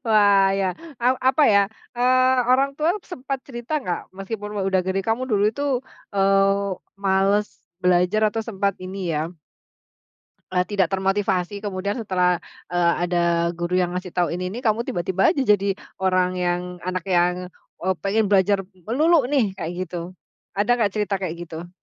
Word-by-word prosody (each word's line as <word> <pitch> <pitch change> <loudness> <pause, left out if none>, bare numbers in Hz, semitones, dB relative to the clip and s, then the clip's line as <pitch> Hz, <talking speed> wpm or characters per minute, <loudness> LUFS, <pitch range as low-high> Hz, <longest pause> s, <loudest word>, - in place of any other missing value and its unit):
Wah 205 -3 +5
ya 195 - +1 0.3
a 240 - +1 0.2
apa 265 +4 +3
ya, 200 - +7 0.4
eee, 255 +1 +4 0.2
orang 270 +2 +4
tua 310 +1 +1 0.2
sempat 275 -5 -5
cerita 240 +1 -7
nggak 175 -5 -2 0.2
meskipun 205 +2 -5 0.2
udah 190 -1 +2
gede 190 +1 0
kamu 225 +3 +1
dulu 205 -2 +2
itu, 280 - -5 0.5
eee, 195 0 +2 0.2
males 195 +1 +2 0.3
belajar 180 +3 +3
atau 225 +1 -3
sempat 200 -3 -1
ini 190 +2 -6 0.2
ya 160 +3 -2 1.2
eee, 180 -1 +2
tidak 195 -1 +1
termotivasi 195 0 0
kemudian 200 0 -2
setelah, 180 -3 +1 0.3
eee, 170 -1 +3
ada 170 -1 +1
guru 175 +2 -1
yang 180 -1 0
ngasih 180 0 -4
tahu 175 -1 0
ini 180 +1 -3
nih 230 +5 -5
kamu 220 +1 +2
tiba-tiba 190 - +1
jadi 210 - +2 0.4
orang 185 -1 +2
yang 175 -1 0 0.2
anak 185 0 -3
yang, 180 0 +1 0.3
eee, 190 +1 0
pengen 210 +2 +1
belajar 200 0 +3 0.3
melulu 290 +3 +3
nih 235 -10 +2
kayak 170 -2 -5
gitu, 175 0 -6 0.5
ada 210 +4 +1
nggak 225 -4 +1
cerita 210 -1 0
kayak 170 -3 -2
gitu? 165 +2 -8
195 Hz, 155 wpm, -23 LUFS, 180-215 Hz, 1.2 s, ya